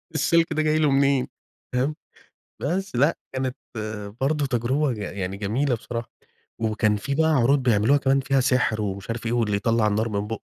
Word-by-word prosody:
السلك 165 -1 +2
ده 155 - +1
جاي 155 0 +2
له 150 -2 +3
منين، 135 -1 +3 1.3
فاهم؟ 165 +6 0
بس 195 -6 -5
لأ، 140 +7 +3 0.2
كانت 130 -1 -2 0.7
برضه 145 +2 +1
تجربة 130 +3 0
يع 105 -3 -5
يعني 95 -1 -4
جميلة 120 +7 0
بصراحة. 115 0 -6 0.5
وكان 110 -1 +1
في 140 +7 -3
بقى 160 +2 +3
عروض 135 -1 +3
بيعملوها 120 +3 +4
كمان 135 0 +2
فيها 135 0 +1
سحر 125 -4 +1
ومش 100 0 -4
عارف 115 0 -4
إيه، 115 - -1
واللي 115 -4 +1
يطلّع 115 0 +2
النار 110 +2 0
من 105 -1 -2
بوقه، 115 0 -5
125 Hz, 180 wpm, -24 LUFS, 110-140 Hz, 1.3 s, بيعملوها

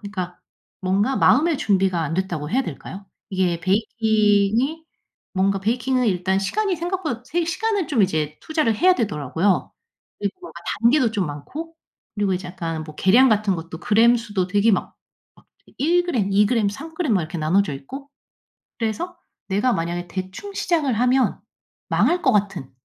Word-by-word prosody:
그러니까 185 -4 -6 0.4
뭔가 200 +8 +1
마음의 310 +3 +4
준비가 190 - +1
안 155 - -3
됐다고 170 -5 -2
해야 260 +4 +2
될까요? 190 - -8 0.2
이게 180 -3 0
베이킹이 220 - +1 0.5
뭔가 195 +1 +1
베이킹은 245 +4 0
일단 190 0 +1
시간이 385 - 0
생각보다 335 -7 -3
세 340 +5 -1
시간을 395 +2 -1
좀 245 -9 +2
이제 155 -5 0
투자를 310 -8 +1
해야 365 - +5
되더라고요. 175 - 0 0.5
그리고 205 - -5
아 - - -13 0.3
단계도 235 -1 +4
좀 195 -5 0
많고 280 - -7 0.4
그리고 200 -2 +1
이제 180 0 -5
약간 165 -3 -4
뭐 155 - -11
계량 240 +8 +5
같은 210 -2 +2
것도 165 0 -7
그램 230 +5 +4
수도 205 -6 -2
되게 205 +4 +3
막, - - -1 0.4
막 - - -23 0.2
되게 - - -22
1 345 +5 +2
그램, 230 - 0
2 205 +2 +5
그램, 225 -4 +2
3 280 +11 -8
그램 315 -9 0
막 185 - +2
이렇게 170 +3 -5
나눠져 160 +2 +2
있고 270 - -9 0.7
그래서 330 +11 -2 0.3
내가 210 +6 +2
만약에 175 0 -3
대충 185 - -6
시작을 310 -8 +1
하면 250 -1 +2 0.5
망할 355 +1 +2
것 - - +4
같은 195 -9 -1
205 Hz, 335 characters per minute, -22 LUFS, 185-265 Hz, 0.7 s, 해야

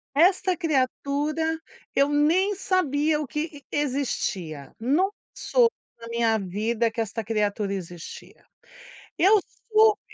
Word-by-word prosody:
Esta 370 +2 +4
criatura, 305 +1 0 0.4
eu 280 +1 +4
nem 340 +8 +3
sabia 305 -5 +1
o 290 - -4
que 300 0 -5
existia. 200 - -2
Nunca 345 - +1 0.2
soube 475 -2 +2 0.3
na 230 - -9
minha 230 -1 +2
vida 215 +5 0
que 230 0 -2
esta 225 +1 -3
criatura 205 -2 -1
existia. 175 -3 -8 0.7
Eu 405 +4 +6 0.3
soube 435 0 +5
285 Hz, 115 wpm, -25 LUFS, 225-335 Hz, 0.7 s, Eu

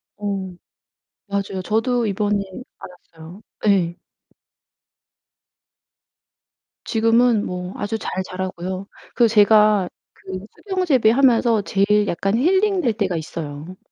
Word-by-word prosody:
어, 195 -3 -4 0.7
맞아요. 200 -1 -3
저도 235 +4 0
이번 205 0 0 0.7
알았어요. 165 +5 -12 0.3
예. 180 -3 +1 2.8
지금은 230 0 +2
뭐 180 +1 -5
아주 205 +2 -3
잘 - - -5 0.2
자라고요. 185 +1 -5 0.3
그 235 - +5
제가 210 -3 +4 0.2
그 190 +1 -8
수경재배하면서 255 - +2
제일 205 +1 +2
약간 195 +4 -1
healing 380 - +2
될 235 -7 +1
때가 200 -5 -1
있어요. 160 +1 -6
205 Hz, 225 characters per minute, -21 LUFS, 185-230 Hz, 2.8 s, 그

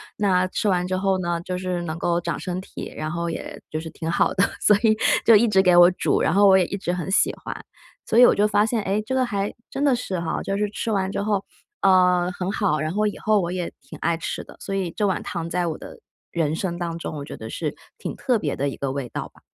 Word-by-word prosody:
那 185 -3 +2
吃 205 +3 -1
完 180 -1 +1
之 185 - -1
后 190 0 +1
呢， 175 -2 -1
就 180 +1 -4
是 180 -1 -2
能 165 -1 -4
够 170 +1 +1
长 - - -3
身 180 0 -4
体， - - -8
然 155 0 -4
后 170 0 -2
也 165 - -6
就 155 - -3
是 160 - -7
挺 160 0 -5
好 170 - +2
的， 195 - +4 0.2
所 210 - +5
以 220 -1 +5 0.3
就 230 - +8
一 215 +3 +6
直 200 -4 +4
给 180 -2 +4
我 175 +1 +8
煮， 180 - 0
然 155 - +2
后 200 +2 +6
我 190 -1 +7
也 190 - +4
一 200 - -4
直 180 -2 -2
很 180 +1 -3
喜 195 - +3
欢。 - - -4 0.5
所 225 - 0
以 245 - +10
我 - - +6
就 205 +1 +3
发 205 0 +3
现， 225 -1 0
诶， 200 +2 0
这 260 - -3
个 260 -1 +2
还 200 -4 -2 0.2
真 275 - -3
的 280 -2 +4
是 195 -8 -2
哈， 170 - -2
就 195 - -2
是 210 0 0
吃 220 +2 -3
完 195 -2 0
之 - - -2
后， 205 -1 0 0.4
呃， 180 -1 +4
很 180 +1 -4
好， 195 -7 +1
然 155 +2 -2
后 210 +2 +1
以 205 - -4
后 215 -2 +2
我 175 -1 -2
也 180 -1 -3
挺 - - -11
爱 170 0 +1
吃 165 - -4
的。 - - -14
所 195 - -4
以 185 -3 -1
这 210 - -1
碗 190 - 0
汤 170 -2 -4
在 175 0 0
我 160 - -3
的 - - -11 0.3
人 160 -2 0
生 175 0 -3
当 170 -1 -3
中， 160 - -5
我 140 - -6
觉 - - -8
得 - - -8
是 - - -3 0.2
挺 - - -5
特 250 -3 +1
别 145 -7 -2
的 140 +1 -1
一 - - -7
个 140 -1 -2
味 135 -2 -4
道 - - -5
吧。 - - -24
185 Hz, 295 characters per minute, -23 LUFS, 170-205 Hz, 0.5 s, 以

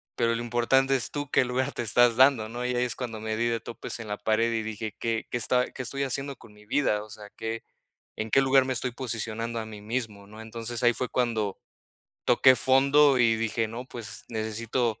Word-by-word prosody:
Pero 115 -1 +2
lo 115 - -3
importante 135 +3 +2
es, 115 -7 -1
¿tú 145 -1 -4
qué - - +4
lugar 130 +2 -1
te - - -3
estás 120 +1 +4
dando? 130 -4 +5
¿No?, 120 +1 -5
y 125 0 -1
ahí 120 - +2
es 125 - -3
cuando 115 -4 -5
me 110 0 -2
di 120 - +1
de 115 -1 0
topes 115 +1 -7
en 110 - -7
la 105 - -2
pared 110 +2 +1
y 110 -1 -1
dije: 110 -1 -5
"¿Qué 115 -1 -2
qué 120 - 0
esta 125 +2 +1
y, - - -17
qué 130 - -6
estoy 140 +3 -3
haciendo 135 +1 -2
con 105 - -16
mi 105 0 -18
vida?" 105 -5 +1
O 110 - -14
sea, 105 -1 -10
qué, 115 0 -4 0.5
¿en 110 0 -4
qué 135 - +5
lugar 135 0 +5
me 130 - -1
estoy 125 +1 -2
posicionando 115 -2 -3
a 110 - -6
mí 105 -2 -10
mismo? 110 -3 -4
¿No?, 105 +2 -12
entonces 115 +1 -5
ahí 120 -1 +4
fue 125 - -2
cuando, 110 -5 -1 0.7
toqué 130 -1 +6
fondo 135 +2 +5
y 115 -2 +4
dije: 115 0 -1
"No, 120 +3 -7
pues, 115 -3 -8
necesito 110 +1 -2
115 Hz, 230 wpm, -27 LUFS, 110-125 Hz, 0.7 s, toqué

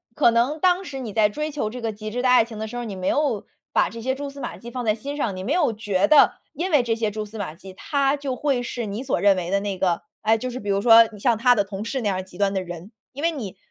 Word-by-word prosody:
可 235 - +5
能 255 +7 +1
当 365 +1 +3
时 270 -4 -6
你 235 -4 -5
在 210 0 +4
追 300 +8 -4
求 280 -7 -2
这 245 +2 -7
个 225 -1 -1
极 215 +1 -7
致 245 +3 -3
的 255 - +2
爱 250 -3 +6
情 225 -2 -10
的 220 0 -4
时 245 - -6
候， 240 - -4
你 200 -3 -5
没 185 0 -2
有 280 -9 0 0.3
把 - - +3
这 230 0 -8
些 260 +2 -1
蜘 285 0 -5
丝 280 0 -11
马 - - -5
迹 235 0 -10
放 245 -1 -4
在 215 0 +2
心 285 +6 -6
上， 215 -9 -1
你 185 - -6
没 250 - -3
有 305 -10 +2
觉 205 -2 0
得 305 - +7 0.2
因 365 +2 -3
为 290 -5 +4
这 230 -1 0
些 220 -2 -1
蛛 215 0 -4
丝 220 +1 -10
马 180 -7 -4
迹， 190 +2 -12
他 280 +5 0
就 280 -2 -4
会 270 -4 0
是 240 -1 -4
你 210 +5 -4
所 265 - 0
认 200 -1 +5
为 180 0 -3
的 200 - +2
那 200 -2 -3
个 175 -2 0 0.2
哎， 220 +1 +3
就 255 +3 -4
是 250 +1 -6
比 205 - -5
如 195 0 +2
说 230 0 +8
像 235 0 +2
他 245 +2 +5
的 205 -3 +1
同 195 +1 -6
事 260 +4 -3
那 220 - -2
样 190 -2 0
儿 185 - -4
极 185 -1 -15
端 200 -1 +1
的 190 -1 -1
人。 175 +4 -9 0.2
因 285 - -7
为 335 - +3
你 230 - -6
225 Hz, 335 characters per minute, -23 LUFS, 200-265 Hz, 0.3 s, 说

